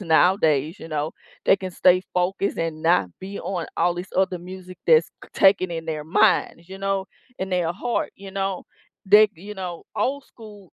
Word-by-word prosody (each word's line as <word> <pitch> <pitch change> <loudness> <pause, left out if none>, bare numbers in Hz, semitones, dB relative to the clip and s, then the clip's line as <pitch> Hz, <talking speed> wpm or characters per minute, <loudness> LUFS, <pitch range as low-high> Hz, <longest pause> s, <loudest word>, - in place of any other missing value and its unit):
nowadays, 160 -3 +3
you 165 - -9
know, 155 0 -2 0.3
they - - +6
can 185 -1 -6
stay 180 +1 +4
focused 185 +2 0
and 160 -1 -3
not 165 - +3
be 195 +2 -7
on 180 -4 -3
all 175 +1 +2
these 180 +2 -7
other 185 -1 +1
music 185 0 -10
that's 475 -1 +5
c - - -12
taken 190 -2 +4
in 165 -1 -4
their 155 -2 -3
minds, 170 +2 +2
you 190 0 -9
know, 195 -1 -1 0.3
in 190 0 -4
their 175 -2 0
heart, 235 +6 -2
you 195 -1 -10
know, 195 -1 -2 0.4
they 210 +2 +7
you 200 +5 -9
know, 180 -3 -6
old 280 +1 -1
school 210 -5 -14
185 Hz, 185 wpm, -23 LUFS, 170-195 Hz, 0.4 s, they